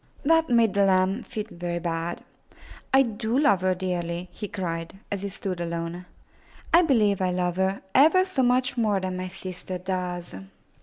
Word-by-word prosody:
That 325 Hz, +2 st, +3 dB
made 230 Hz, -4 st, +4 dB
the 200 Hz, -, +3 dB
lamb 190 Hz, +3 st, +2 dB
feel 215 Hz, -3 st, -5 dB
very 175 Hz, 0 st, -4 dB
bad. 170 Hz, 0 st, -3 dB, 0.7 s
"I 270 Hz, 0 st, +6 dB
do 225 Hz, 0 st, -2 dB
love 275 Hz, -11 st, +4 dB
her 185 Hz, 0 st, +2 dB
dearly,*' 175 Hz, -1 st, -3 dB
he 210 Hz, -, -6 dB
cried, 165 Hz, -3 st, -4 dB, 0.2 s
as 200 Hz, -2 st, -2 dB
he 200 Hz, -, -3 dB
stood 190 Hz, -2 st, -5 dB
alone. 170 Hz, +1 st, -4 dB, 0.7 s
^'I 340 Hz, 0 st, +6 dB
believe 210 Hz, -, +3 dB
I 185 Hz, -, +2 dB
love 180 Hz, 0 st, -1 dB
her 190 Hz, +1 st, 0 dB
ever 325 Hz, +7 st, +6 dB
so 370 Hz, -8 st, -1 dB
much 255 Hz, +1 st, +2 dB
more 210 Hz, -3 st, +2 dB
than 185 Hz, -1 st, -3 dB
my 185 Hz, 0 st, -4 dB
sister 185 Hz, 0 st, -7 dB
does." 180 Hz, -1 st, -4 dB
190 Hz, 170 wpm, -26 LUFS, 180-230 Hz, 0.7 s, I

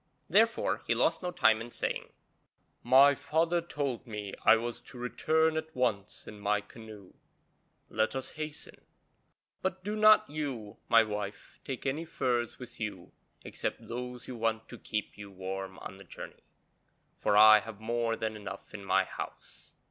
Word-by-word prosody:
Therefore -, -, +3 dB
he -, -, +2 dB
lost -, -, +2 dB
no 180 Hz, -, -2 dB
time 115 Hz, -10 st, +3 dB
in 120 Hz, -, -7 dB
saying, -, -, -3 dB, 0.7 s
'My 135 Hz, +4 st, +7 dB
father 165 Hz, +4 st, +1 dB
told 140 Hz, -7 st, -3 dB
me 105 Hz, -3 st, -6 dB
I -, -, +8 dB
was 120 Hz, +1 st, -4 dB
to 125 Hz, -, -13 dB
return 160 Hz, +6 st, +1 dB
at 160 Hz, 0 st, -5 dB
once 110 Hz, -6 st, -1 dB
in 105 Hz, -, -9 dB
my 105 Hz, +1 st, +1 dB
canoe; 105 Hz, -2 st, -12 dB, 0.7 s
let 110 Hz, +3 st, 0 dB
us 130 Hz, -, -3 dB
hasten, 155 Hz, -1 st, -7 dB, 0.8 s
but 185 Hz, 0 st, -2 dB
do 210 Hz, +2 st, -2 dB
not 215 Hz, 0 st, +6 dB
you, 135 Hz, -9 st, -5 dB
my 115 Hz, -1 st, +7 dB
wife, 105 Hz, -1 st, -6 dB
take 130 Hz, -2 st, -5 dB
any 140 Hz, +4 st, -1 dB
furs 120 Hz, -6 st, -1 dB
with 125 Hz, -3 st, -10 dB
you 100 Hz, -5 st, -5 dB, 0.3 s
except -, -, -4 dB
those 125 Hz, 0 st, -6 dB
you 130 Hz, -, -6 dB
want 115 Hz, 0 st, -1 dB
to 120 Hz, -, -9 dB
keep 105 Hz, -1 st, -4 dB
you 100 Hz, -1 st, -8 dB
warm 95 Hz, 0 st, -6 dB
on 95 Hz, -, -9 dB
the 100 Hz, -, -12 dB
journey, -, -, -10 dB, 0.7 s
for 105 Hz, -, +1 dB
I 110 Hz, 0 st, +9 dB
have 110 Hz, -1 st, -9 dB
more 115 Hz, +1 st, 0 dB
than 110 Hz, -1 st, -3 dB
enough 100 Hz, -2 st, -8 dB
in 105 Hz, -2 st, -7 dB
my -, -, +3 dB
house.' -, -, -9 dB
115 Hz, 165 wpm, -31 LUFS, 105-135 Hz, 0.8 s, I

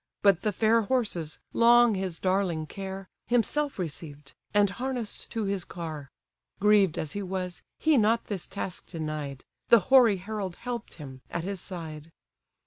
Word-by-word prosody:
But 200 Hz, -4 st, +5 dB
the 210 Hz, -, +1 dB
fair 225 Hz, +3 st, +3 dB
horses, 200 Hz, -9 st, -1 dB, 0.2 s
long 240 Hz, 0 st, +6 dB
his 190 Hz, -3 st, -3 dB
darling 185 Hz, -4 st, 0 dB
care, 195 Hz, +3 st, -7 dB, 0.2 s
Himself 275 Hz, +5 st, +1 dB
received, 150 Hz, -5 st, -6 dB, 0.2 s
and 205 Hz, 0 st, +4 dB
harness'd 245 Hz, +1 st, -4 dB
to 225 Hz, -2 st, -2 dB
his 195 Hz, -2 st, -1 dB
car: 155 Hz, -6 st, -7 dB, 0.5 s
Grieved 205 Hz, -4 st, +4 dB
as 155 Hz, -, -2 dB
he 205 Hz, -, -3 dB
was, 185 Hz, -2 st, -4 dB, 0.2 s
he 315 Hz, -3 st, +3 dB
not 225 Hz, +2 st, +2 dB
this 195 Hz, -5 st, -4 dB
task 195 Hz, -2 st, -6 dB
denied; 155 Hz, -5 st, -5 dB, 0.2 s
The 235 Hz, -, +8 dB
hoary 235 Hz, -7 st, +7 dB
herald 195 Hz, -1 st, -4 dB
help'd 240 Hz, -2 st, -6 dB
him, 135 Hz, -5 st, -10 dB
at 170 Hz, -, -3 dB
his 195 Hz, 0 st, -3 dB
side. 160 Hz, -4 st, -7 dB
195 Hz, 150 wpm, -28 LUFS, 165-220 Hz, 0.5 s, The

